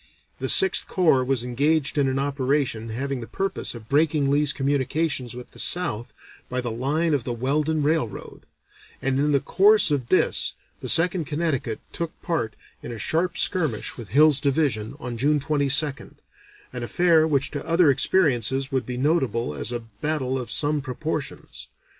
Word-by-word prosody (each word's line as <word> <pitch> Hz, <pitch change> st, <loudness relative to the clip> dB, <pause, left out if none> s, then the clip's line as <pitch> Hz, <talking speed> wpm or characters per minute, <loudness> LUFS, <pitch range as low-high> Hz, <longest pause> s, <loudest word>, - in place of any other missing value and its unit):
The -, -, -3 dB
Sixth 385 Hz, -1 st, +4 dB
Corps 160 Hz, -8 st, +2 dB
was 130 Hz, -2 st, 0 dB
engaged 140 Hz, +4 st, 0 dB
in 140 Hz, -2 st, +2 dB
an 130 Hz, 0 st, -1 dB
operation 135 Hz, -4 st, -1 dB
having 130 Hz, +3 st, -4 dB
the 115 Hz, -, -8 dB
purpose 195 Hz, -8 st, -3 dB
of 110 Hz, -2 st, -11 dB
breaking 145 Hz, 0 st, +2 dB
Lee's 145 Hz, +1 st, +2 dB
communications 135 Hz, -2 st, -1 dB
with 125 Hz, 0 st, -10 dB
the -, -, -9 dB
South 120 Hz, -11 st, 0 dB, 0.4 s
by 125 Hz, -, -2 dB
the 120 Hz, -2 st, -3 dB
line 150 Hz, +8 st, 0 dB
of 140 Hz, -5 st, 0 dB
the 120 Hz, -, -3 dB
Weldon 150 Hz, +5 st, 0 dB
Railroad, 150 Hz, -7 st, -3 dB, 0.5 s
and 135 Hz, 0 st, -1 dB
in 150 Hz, +1 st, +1 dB
the 140 Hz, -, +3 dB
course 205 Hz, +3 st, +4 dB
of 130 Hz, -5 st, -1 dB
this -, -, +1 dB, 0.2 s
the -, -, -4 dB
Second 170 Hz, -1 st, +3 dB
Connecticut 145 Hz, -7 st, -2 dB
took 170 Hz, -1 st, -5 dB
part 155 Hz, -, -2 dB, 0.3 s
in 120 Hz, -, -7 dB
a 115 Hz, -, -6 dB
"sharp 170 Hz, -, 0 dB
skirmish" 155 Hz, -, +1 dB
with 115 Hz, -4 st, -9 dB
Hill's 145 Hz, -, +4 dB
Division, 140 Hz, -5 st, 0 dB
on 120 Hz, -1 st, -6 dB
June 150 Hz, +3 st, +2 dB
22nd, 145 Hz, 0 st, +1 dB, 0.6 s
an 125 Hz, -, -5 dB
affair 160 Hz, +5 st, +3 dB
which 140 Hz, -3 st, 0 dB
to 145 Hz, -, -5 dB
other 165 Hz, -2 st, +4 dB
experiences 135 Hz, -, +1 dB
would 130 Hz, -3 st, -2 dB
be 125 Hz, -1 st, -4 dB
notable 130 Hz, -, 0 dB
as 75 Hz, -, -4 dB
a 120 Hz, -1 st, -3 dB, 0.2 s
battle 135 Hz, -4 st, -1 dB
of 120 Hz, -3 st, -6 dB
some 145 Hz, +3 st, +1 dB
proportions. 135 Hz, -, -5 dB
140 Hz, 165 wpm, -24 LUFS, 125-155 Hz, 0.6 s, Sixth